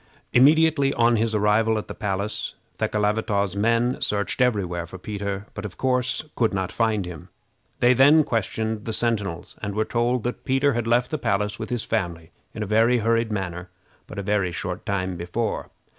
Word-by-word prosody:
[Illustration: - - -32
The - - -33
escape.] 120 - +5 0.4
Immediately 140 0 +2
on 120 0 +4
his 110 0 0
arrival 105 +2 +3
at 105 - -4
the - - -6
palace, 100 +1 -3 0.2
Thekelavitaw's 105 -2 0
men 115 +4 +1
searched 100 +4 0
every 110 -6 +2
where 85 -1 -4
for 95 - -9
Peter, 100 0 -4
but 105 - -6
of 105 -4 -7
course 125 0 0
could 115 -4 +1
not 95 -1 -2
find 110 -4 0
him. 85 -4 -9 0.5
They 125 +1 +6
then 145 +5 +6
questioned 110 -2 -2
the 115 - -3
sentinels, 105 -7 -1
and 100 -1 -4
were 110 0 +1
told 120 0 0
that 125 - -4
Peter 135 +1 +2
had 120 -1 -2
left 120 +1 +2
the 155 - -2
palace 105 +1 -1
with 110 - -5
his 120 -3 -2
family 85 -6 -3 0.2
in 110 - -4
a - - -3
very 115 +4 +3
hurried 115 0 +1
manner 90 -3 -4 0.4
but - - -10
a 100 - -3
very 100 -2 0
short 90 +1 -5
time 95 -3 -1
before. 95 +6 -3
105 Hz, 195 wpm, -24 LUFS, 100-120 Hz, 0.5 s, They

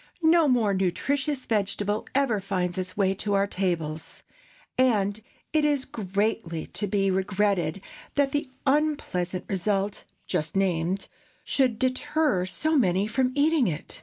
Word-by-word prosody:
No 325 0 +5
more 235 -6 +3
nutritious 265 - 0
vegetable 205 0 -1
ever 270 -7 +2
finds 185 -2 -2
its 185 +1 -5
way 190 -2 +3
to 200 +1 -1
our 195 0 +3
tables, 170 -6 -3 0.5
and 215 -5 +2 0.3
it 310 -1 +3
is 290 -3 +2
greatly 200 -4 -2
to 205 - -4
be 195 0 +1
regretted 190 -2 0 0.3
that 285 -1 +2
the 290 -1 -1 0.2
unpleasant 270 - 0
result 195 +1 -1 0.2
just 155 +4 -2
named 185 0 0 0.4
should 255 -5 +1
deter 260 - +1
so 315 +10 -1
many 195 -7 +3
from 255 +4 +1
eating 295 -3 +3
it. 160 -3 -4
205 Hz, 135 wpm, -26 LUFS, 185-265 Hz, 0.5 s, No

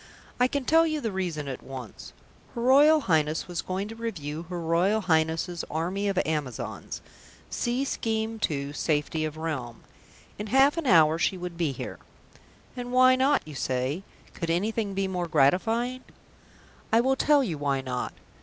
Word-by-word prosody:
I 250 - +5
can 280 0 -3
tell 325 +3 +5
you 310 -1 -1
the 225 -6 -2
reason 175 -6 -3
at 130 -2 -5
once. 130 -5 -9 0.4
Her 235 - -3
Royal 295 +5 +6
Highness 155 - +1
was 175 -2 -3
going 190 +2 -3
to 225 - -7
review 165 -9 -5
her 175 -1 -4
Royal 175 +6 +2
Highness's 165 0 0
Army 180 +6 -1
of 195 -2 -1
Amazons 150 -7 -4 0.5
(see 245 +3 -1
Scheme 225 -3 -2
II, 140 -1 -3
Safety 155 +1 0
of 155 0 -5
Realm). 135 -8 -4 0.6
In 210 - -4
half 270 +6 +4
an 330 -4 -2
hour 160 -5 +5
she 185 - +1
would 180 -1 -6
be 165 -4 0
here. - - -7 0.8
And 245 -1 -5
why 255 0 +6
not? 270 - +2
you 155 - -8
say. 130 +4 -1 0.3
Could 170 - -4
anything 200 +3 -1
be 195 0 0
more 180 -2 -2
gratifying? 225 - +2 0.9
I 225 - +5
will 265 +3 +3
tell 290 +1 +4
you 165 - -3
why 140 -2 0
not. 125 -1 -4
180 Hz, 165 wpm, -27 LUFS, 155-235 Hz, 0.9 s, Royal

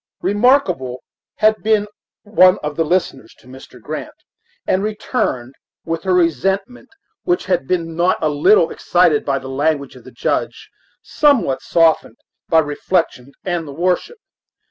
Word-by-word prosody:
Remarkable 190 - +1 0.3
had 215 0 +2
been 215 -1 +2 0.4
one 185 -3 +4
of 150 0 -4
the 165 - +1
listeners 155 -8 -2
to - - -23
Mr. 130 +1 -14
Grant, - - -7 0.5
and 185 - +1
returned 210 - -3 0.3
with 165 0 -3
her 190 - +2
resentment, 190 - -1 0.3
which 355 -1 -1
had 180 -8 -1
been 165 -3 -2
not 175 +2 +2
a 155 - 0
little 160 +4 +3
excited 175 -4 +2
by 135 -1 0
the 135 -1 -8
language 140 +1 -1
of - - -14
the - - -12
Judge, - - -3 0.3
somewhat 280 - +2
softened 165 -2 +1 0.3
by 165 - +3
reflection 145 -3 -1
and 175 -4 -3
the 140 - -8
worship. 180 - -1
170 Hz, 145 wpm, -18 LUFS, 145-195 Hz, 0.5 s, one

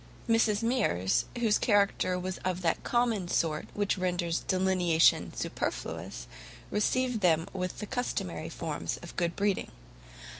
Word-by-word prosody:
Mrs 225 -2 +3
Mears, 95 - +1
whose 225 -3 +2
character 200 -4 +2
was 185 0 -4
of 185 0 -2
that 165 - +1
common 235 -6 +1
sort 160 -3 0
which 205 -1 0
renders 175 -2 0
delineation 185 -3 +3
superfluous, - - -4 0.5
received 245 +2 +1
them 165 -1 +3
with 185 -1 -3
the 210 - -4
customary 245 +4 -3
forms - - -4
of - - -9
good 170 -1 0
breeding. 200 -1 0
185 Hz, 125 wpm, -30 LUFS, 175-215 Hz, 0.5 s, Mrs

